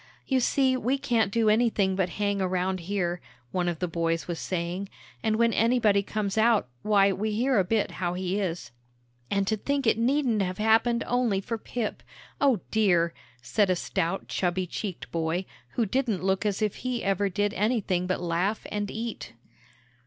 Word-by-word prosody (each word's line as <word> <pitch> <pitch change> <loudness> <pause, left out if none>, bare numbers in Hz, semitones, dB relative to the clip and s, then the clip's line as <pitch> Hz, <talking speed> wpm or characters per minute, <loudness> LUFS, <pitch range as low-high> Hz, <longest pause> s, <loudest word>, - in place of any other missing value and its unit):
"You 265 -1 +2
see 260 +1 +2
we 255 +2 0
can't 235 -6 +1
do 225 +1 +2
anything 215 -3 +3
but 185 -2 0
hang 200 -1 0
around 185 0 0
here," 175 -1 -2 0.3
one 180 -1 0
of 170 - -3
the 180 - -2
boys 165 0 -1
was 170 -2 -3
saying, 180 +2 -3 0.3
"and 220 -1 +1
when 230 0 +3
anybody 225 -3 +3
comes 205 0 -2
out, 225 - +4
why, 200 -2 +4
we 210 +3 -2
hear 245 +2 +2
a - - +4
bit 210 +3 0
how 175 -1 -2
he 185 +2 -1
is." 170 -10 -3 0.6
"And 200 -1 +1
to 220 - +1
think 280 +5 -1
it 225 0 +3
needn't 245 -3 +2
have 185 -1 -2
happened 225 +2 +3
only 245 -5 +1
for 225 +3 -4
Pip, 225 -1 -4 0.4
O 265 -9 +3
dear!" 175 -6 +3 0.3
said 205 - +2
a 185 - +3
stout, 170 +2 -2
chubby 180 0 -1
cheeked 185 +1 -6
boy, 165 +2 -1 0.3
who 235 - +1
didn't 225 -3 -1
look 190 +2 +1
as 205 +1 -1
if 210 - -1
he 255 -2 -3
ever 195 +1 +1
did 205 +2 0
anything 205 -5 0
but 185 - 0
laugh 180 +5 -1
and 205 -1 -2
eat. 230 0 -5
200 Hz, 180 wpm, -27 LUFS, 185-225 Hz, 0.6 s, out